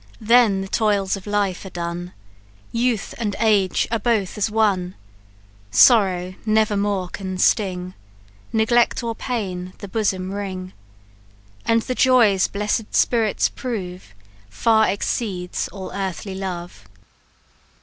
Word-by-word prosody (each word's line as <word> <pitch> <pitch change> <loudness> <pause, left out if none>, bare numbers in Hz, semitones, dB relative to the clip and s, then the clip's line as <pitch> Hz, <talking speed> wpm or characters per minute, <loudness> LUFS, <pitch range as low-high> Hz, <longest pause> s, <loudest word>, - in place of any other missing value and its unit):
Then 225 -3 +4
the 195 - -5
toils 200 -2 +1
of 195 +1 -10
life 205 -3 -1
are 190 - -8
done, 175 0 -5 0.6
Youth 235 -2 -1
and 210 -4 -2
age 205 -5 +2
are 230 - +1
both 210 -3 0
as 210 +1 0
one; 200 -5 +1 0.7
Sorrow 185 - +4
never 215 -1 +2
more 200 -2 0
can 185 0 -6
sting, 185 -2 +1 0.6
Neglect 235 +2 +2
or 230 -1 -2
pain 190 -7 -4
the 200 - -8
bosom 190 -3 -1
wring; 190 -2 -5 0.9
And 230 0 +3
the 255 - -2
joys 235 -7 +4
bless'd 210 +2 -2
spirits 225 -4 +2
prove, 185 - -6 0.3
Far 220 - +3
exceeds 195 -3 -2
all 190 0 -8
earthly 195 0 -4
love!" 175 - -6
200 Hz, 120 wpm, -22 LUFS, 185-220 Hz, 0.9 s, Then